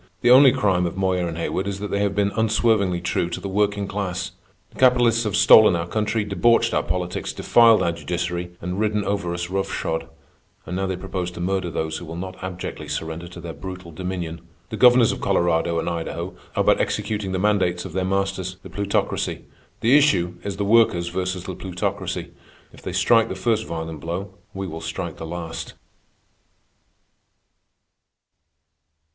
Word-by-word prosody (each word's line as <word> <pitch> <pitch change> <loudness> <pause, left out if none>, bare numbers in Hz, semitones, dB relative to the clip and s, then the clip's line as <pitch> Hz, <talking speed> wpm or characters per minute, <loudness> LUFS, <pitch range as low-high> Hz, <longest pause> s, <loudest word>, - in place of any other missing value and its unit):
The 120 - +4
only 130 +1 +9
crime 95 -6 +1
of 85 - -6
Moyer 95 -2 +1
and 85 -1 -5
Haywood 95 +3 -2
is 100 -1 -3
that 100 0 -5
they 100 - 0
have 100 -1 0
been 100 0 +1
unswervingly 110 -5 +2
true 85 -1 -1
to 85 - -4
the - - -5
working 100 0 0
class. 95 -2 -3 0.4
The - - -16
capitalists 120 -2 +4
have 105 - -1
stolen 110 -5 +7
our 85 0 -2
country, 105 +3 -1
debauched 105 +4 +2
our - - +2
politics, 90 -1 -3
defiled 115 -2 +5
our 85 - +1
judiciary, 85 +1 -3
and 90 +3 -3
ridden 105 -1 0
over 100 -4 -1
us 85 0 -4
rough 95 0 -1
shod, 80 0 -2 0.6
and 90 - -5
now 95 +1 -1
they 95 - -2
propose 90 -1 -4
to 90 - -10
murder 95 0 -1
those 80 -1 -3
who 85 - -8
will 80 +1 -7
not 95 +1 -7
abjectly 90 -1 -6
surrender 80 +1 -4
to 85 +1 -11
their 85 -1 -7
brutal 90 +3 -8
dominion. 85 -1 -5 0.3
The - - -3
governors 125 +1 +6
of - - -5
Colorado 85 -1 +1
and 80 - -2
Idaho 85 +1 -4 0.2
are - - +2
but - - +3
executing 105 -3 -2
the 95 - -1
mandates 95 -3 +1
of 90 - -8
their 95 0 0
masters, 95 -1 -1
the - - -11
Plutocracy. 100 0 -1 0.4
The 120 +5 +5
issue 95 -13 +3
is 100 -1 -4
the 100 - -1
Workers 100 -6 +3
versus 90 0 -3
the 95 - -5
Plutocracy. 90 0 -4 0.4
If - - -15
they - - -5
strike 115 -1 +3
the - - -4
first 110 +3 0
violent 80 -1 -5
blow, 90 +5 -5 0.2
we 95 0 -5
will 80 -2 -6
strike 80 +1 -5
the 80 - -6
last. 85 -1 -6
95 Hz, 180 wpm, -23 LUFS, 85-105 Hz, 0.6 s, only